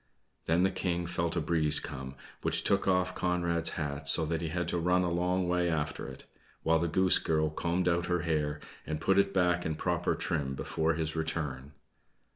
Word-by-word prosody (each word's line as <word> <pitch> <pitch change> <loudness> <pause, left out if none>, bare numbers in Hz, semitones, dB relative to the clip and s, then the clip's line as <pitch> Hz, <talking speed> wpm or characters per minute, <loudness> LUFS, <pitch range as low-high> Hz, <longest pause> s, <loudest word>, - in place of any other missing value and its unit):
Then 85 +3 +2
the 95 - +3
King 85 -1 -2
felt 85 -1 -2
a - - +1
breeze 75 -2 +2
come, 70 -2 -7 0.3
which - - +1
took 100 0 +1
off 90 -1 +2
Conrad's 85 -2 0
hat, 70 -2 -4
so 80 +3 +5
that 80 +1 -2
he 85 - -2
had 85 +1 -2
to 85 - -1
run 90 +2 +2
a 90 - 0
long 90 +1 0
way 90 0 +1
after 75 -4 -2
it; 65 0 -10 0.4
while 80 0 +3
the 85 - 0
Goose 95 +3 +4
Girl 80 -1 0
combed 85 +3 -1
out 85 0 +1
her 90 -1 0
hair 75 -3 -1 0.3
and 75 -1 -2
put 95 +4 +3
it 100 0 +2
back 90 -2 +2
in 80 -1 -2
proper - - 0
trim 70 -3 -2
before 80 +3 -1
his 80 0 -2
return. 75 -4 -3
85 Hz, 200 wpm, -30 LUFS, 80-90 Hz, 0.4 s, so